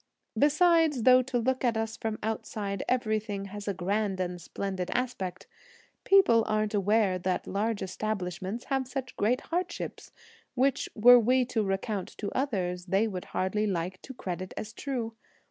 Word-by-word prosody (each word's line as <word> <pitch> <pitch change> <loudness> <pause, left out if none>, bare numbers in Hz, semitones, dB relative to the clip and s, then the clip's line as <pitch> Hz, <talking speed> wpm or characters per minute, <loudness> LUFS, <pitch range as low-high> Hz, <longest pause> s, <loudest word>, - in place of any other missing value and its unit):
Besides, 310 -3 +4
though 255 +1 +7
to 255 0 -2
look 260 +3 0
at 235 -3 +2
us 225 0 -2
from 220 -1 -3
outside 210 -2 -3
everything 215 -4 -1
has 205 0 -7
a 200 - 0
grand 195 +1 -1
and 180 -1 -3
splendid 190 -1 -4
aspect, 235 -8 -3 0.6
people 365 - +6
aren't 215 0 0
aware 205 -2 +2
that 180 +1 -1
large 210 +1 -1
establishments 190 +1 -3
have 270 -2 -1
such 260 0 -5
great 245 +6 +1
hardships, 350 +1 -3 0.4
which, 270 +2 +1
were 245 +3 +8
we 250 +2 +3
to 240 -2 -1
recount 195 0 -3
to 205 - -4
others, 185 -9 -2
they 195 +5 +2
would 185 -4 -5
hardly 210 +3 -1
like 185 -1 -3
to 265 - -10
credit 185 -3 -5
as 220 +1 -5
true. 240 -4 -3
215 Hz, 155 wpm, -29 LUFS, 195-250 Hz, 0.6 s, were